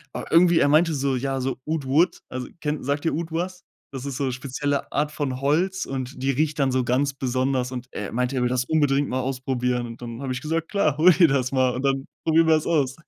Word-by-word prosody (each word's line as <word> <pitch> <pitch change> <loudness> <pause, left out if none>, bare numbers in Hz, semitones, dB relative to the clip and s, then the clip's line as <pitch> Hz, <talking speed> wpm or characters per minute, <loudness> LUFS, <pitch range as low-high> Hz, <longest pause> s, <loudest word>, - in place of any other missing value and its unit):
Aber - - -6
irgendwie 170 0 +5
er 145 - +4
meinte 160 +3 +4
so, 140 -2 0
ja, 135 +1 -2
so 130 +1 -2
„oud 155 -2 -2
wood“, 160 +7 +2
also 130 0 -5
kenn 150 -1 -2
sagt 140 +2 -1
dir 165 - 0
„oud“ 165 0 -4
was? 180 +3 -3 0.3
Das 135 -1 -6
ist 140 -2 -4
so 135 -2 -1
spezielle 140 +3 -3
Art 150 +2 0
von 140 -4 -3
Holz, 180 +7 +1
und 130 -1 -5
die 135 - 0
riecht 150 +2 -1
dann 135 -2 +2
so 130 0 +1
ganz 135 +4 +1
besonders. 130 -1 -1
Und 125 -1 -6
er 105 - -5
meinte, 125 +3 -1
er 125 - 0
will 125 - +1
das 125 0 0
unbedingt 145 -2 +2
mal 130 - -1
ausprobieren. 125 -1 -1
Und 115 +1 -10
dann 115 +1 -7
habe 135 -2 -3
ich 125 - -5
gesagt: 160 +2 -2
„Klar, 155 -8 +1
hol 175 +4 +7
dir 170 -1 +5
das 130 -2 0
mal, 130 -2 +2
und 130 - -3
dann 135 0 0 0.2
probieren 165 0 +3
wir's 155 -1 +3
aus.“ 140 -6 +1
135 Hz, 245 wpm, -24 LUFS, 130-155 Hz, 0.3 s, hol